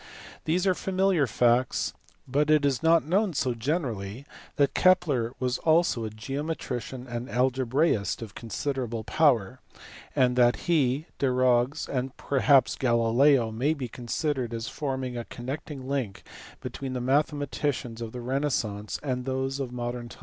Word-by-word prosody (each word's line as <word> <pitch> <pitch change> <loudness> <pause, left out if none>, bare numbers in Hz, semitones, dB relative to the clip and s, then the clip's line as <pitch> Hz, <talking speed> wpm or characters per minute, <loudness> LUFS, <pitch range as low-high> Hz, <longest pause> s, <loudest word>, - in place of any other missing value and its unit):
These 175 +4 +1
are 190 - +4
familiar 185 -5 +1
facts, 120 +2 +2 0.3
but 145 +3 +1
it 155 -2 +4
is 135 -4 +1
not 165 -1 +4
known 190 +4 +1
so 130 -3 0
generally 120 - -3 0.3
that 140 -1 +2
Kepler 145 -11 +3
was 125 -1 -1
also 160 -8 +2
a - - -3
geometrician 130 0 -4
and 120 +1 -5
algebraist 130 -2 +1
of 105 -4 -9
considerable 120 0 -3
power; 130 -6 +2 0.6
and 125 -1 +3
that 120 -1 +5
he, 150 -4 +2
Desargues, 130 +1 +2
and 130 0 -3
perhaps 135 0 +3
Galileo 120 +1 +3
may 135 +8 0
be 135 -4 -4
considered 125 +1 -2
as 115 0 -4
forming 130 -4 -3
a 120 - -4
connecting 135 +2 -6
link 130 -8 -3 0.4
between 135 -2 -5
the 125 - -2
mathematicians 140 -2 -1
of 115 -1 -5
the 125 - -6
renaissance 120 -6 -2
and 125 -3 -2
those 135 +1 -2
of 130 -3 -3
modern 120 -1 -4
times. - - -13
130 Hz, 140 wpm, -27 LUFS, 120-145 Hz, 0.6 s, that